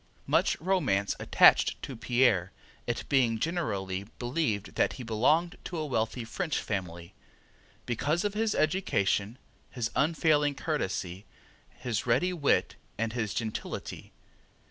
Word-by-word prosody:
Much -, -, +2 dB
romance 150 Hz, -, +1 dB
attached -, -, +5 dB
to 135 Hz, -, -5 dB
Pierre, 115 Hz, -6 st, +2 dB, 0.4 s
it 120 Hz, -, -2 dB
being 125 Hz, -5 st, +3 dB
generally 100 Hz, -, -2 dB
believed 120 Hz, -5 st, -2 dB
that -, -, +1 dB
he 130 Hz, -, -8 dB
belonged 150 Hz, +10 st, +2 dB
to 175 Hz, -, -5 dB
a 155 Hz, -, -2 dB
wealthy 115 Hz, -3 st, -1 dB
French 160 Hz, +7 st, -2 dB
family, 85 Hz, -5 st, -4 dB, 0.7 s
because 150 Hz, -, 0 dB
of 205 Hz, -, 0 dB
his 220 Hz, 0 st, 0 dB
education, 120 Hz, -, +1 dB, 0.3 s
his 115 Hz, -3 st, -3 dB
unfailing 150 Hz, -2 st, +2 dB
courtesy, 95 Hz, -, -3 dB, 0.4 s
his 120 Hz, -2 st, -4 dB
ready 135 Hz, +10 st, +2 dB
wit 150 Hz, -5 st, +1 dB, 0.2 s
and 115 Hz, 0 st, -1 dB
his 110 Hz, -4 st, -2 dB
gentility. 110 Hz, -2 st, -5 dB
125 Hz, 120 wpm, -29 LUFS, 105-155 Hz, 0.7 s, attached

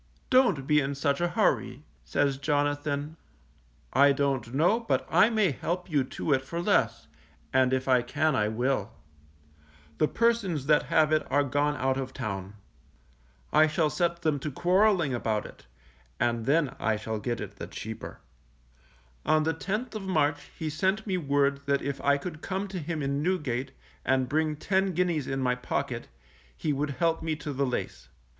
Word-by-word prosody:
Don't 250 Hz, -, +4 dB
be 150 Hz, +1 st, +4 dB
in 140 Hz, +1 st, -2 dB
such 140 Hz, +2 st, 0 dB
a 175 Hz, -, +2 dB
hurry, 145 Hz, -, 0 dB, 0.2 s
says 140 Hz, -2 st, 0 dB
Jonathan, 145 Hz, +1 st, -1 dB, 0.8 s
_I 140 Hz, +1 st, +5 dB
don't 135 Hz, -5 st, -1 dB
know 170 Hz, -, +3 dB
but 230 Hz, -, -1 dB
I 220 Hz, -, +6 dB
may 215 Hz, -7 st, +2 dB
help 175 Hz, +6 st, -4 dB
you 145 Hz, -3 st, +3 dB
to 140 Hz, +3 st, -2 dB
it 130 Hz, -, +2 dB
for 170 Hz, +5 st, -5 dB
less, 115 Hz, -, +1 dB, 0.5 s
and 130 Hz, -1 st, +4 dB
if 130 Hz, 0 st, 0 dB
I 130 Hz, -2 st, +4 dB
can 150 Hz, +5 st, 0 dB
I 105 Hz, -3 st, +2 dB
will; 120 Hz, -1 st, -1 dB, 1.1 s
the 155 Hz, -, +4 dB
persons 220 Hz, -, +1 dB
that 150 Hz, +1 st, +3 dB
have 155 Hz, -1 st, +3 dB
it 155 Hz, 0 st, +3 dB
are 145 Hz, +1 st, +4 dB
gone 145 Hz, +2 st, 0 dB
out 130 Hz, -1 st, 0 dB
of 130 Hz, -1 st, -4 dB
town. 100 Hz, -1 st, -5 dB, 1.0 s
I 155 Hz, +1 st, +6 dB
shall 155 Hz, -1 st, +1 dB
set 170 Hz, 0 st, -1 dB
them 150 Hz, -3 st, +1 dB
to 150 Hz, -, -4 dB
quarrelling 180 Hz, -1 st, +3 dB
about 110 Hz, -3 st, -1 dB
it, -, -, -13 dB, 0.5 s
and 120 Hz, -1 st, 0 dB
then 145 Hz, -1 st, +2 dB
I 110 Hz, 0 st, +1 dB
shall 110 Hz, +1 st, -4 dB
get 120 Hz, +2 st, -3 dB
it 100 Hz, -1 st, -7 dB
the -, -, -6 dB
cheaper._ 110 Hz, +1 st, -7 dB, 1.1 s
On 155 Hz, 0 st, +3 dB
the 160 Hz, +1 st, +1 dB
10th 210 Hz, +10 st, -3 dB
of 215 Hz, -, -4 dB
March 155 Hz, -6 st, 0 dB
he 155 Hz, -1 st, -3 dB
sent 190 Hz, +7 st, 0 dB
me 190 Hz, -3 st, -1 dB
word 140 Hz, -2 st, 0 dB
that 140 Hz, 0 st, +1 dB
if 140 Hz, 0 st, -3 dB
I 140 Hz, 0 st, +3 dB
could 155 Hz, +1 st, -7 dB
come 195 Hz, +1 st, -3 dB
to 190 Hz, -1 st, -4 dB
him 160 Hz, -1 st, -3 dB
in 140 Hz, +1 st, -1 dB
Newgate, 140 Hz, -7 st, -1 dB, 0.3 s
and 130 Hz, -1 st, +1 dB
bring 155 Hz, +3 st, 0 dB
ten 190 Hz, +4 st, 0 dB
guineas 170 Hz, -5 st, 0 dB
in 135 Hz, 0 st, -2 dB
my 125 Hz, -1 st, +2 dB
pocket, 125 Hz, 0 st, -3 dB, 0.5 s
he 150 Hz, -, -1 dB
would 145 Hz, +2 st, -1 dB
help 165 Hz, +2 st, +1 dB
me 160 Hz, -1 st, -1 dB
to 150 Hz, -1 st, -6 dB
the 140 Hz, +1 st, 0 dB
lace. -, -, -4 dB
145 Hz, 180 wpm, -28 LUFS, 130-170 Hz, 1.1 s, I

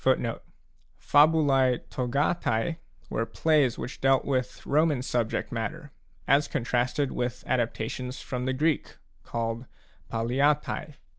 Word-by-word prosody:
d -, -, +2 dB, 0.7 s
Fabulae 145 Hz, -4 st, +4 dB
togatae 140 Hz, +2 st, 0 dB, 0.3 s
were 115 Hz, -, 0 dB
plays 135 Hz, +2 st, +2 dB
which 125 Hz, -, -6 dB
dealt 135 Hz, 0 st, +3 dB
with 130 Hz, -2 st, -2 dB
Roman 150 Hz, -3 st, +2 dB
subject 120 Hz, -3 st, -1 dB
matter, 145 Hz, +6 st, -4 dB, 0.4 s
as 140 Hz, +2 st, +4 dB
contrasted 125 Hz, +1 st, 0 dB
with 120 Hz, 0 st, -3 dB
adaptations 125 Hz, +1 st, -2 dB
from 125 Hz, -1 st, -4 dB
the 130 Hz, -, 0 dB
Greek, 150 Hz, +3 st, 0 dB, 0.2 s
called 115 Hz, +5 st, -3 dB, 0.4 s
palliatae. 140 Hz, +6 st, 0 dB
130 Hz, 105 wpm, -27 LUFS, 120-145 Hz, 0.7 s, Fabulae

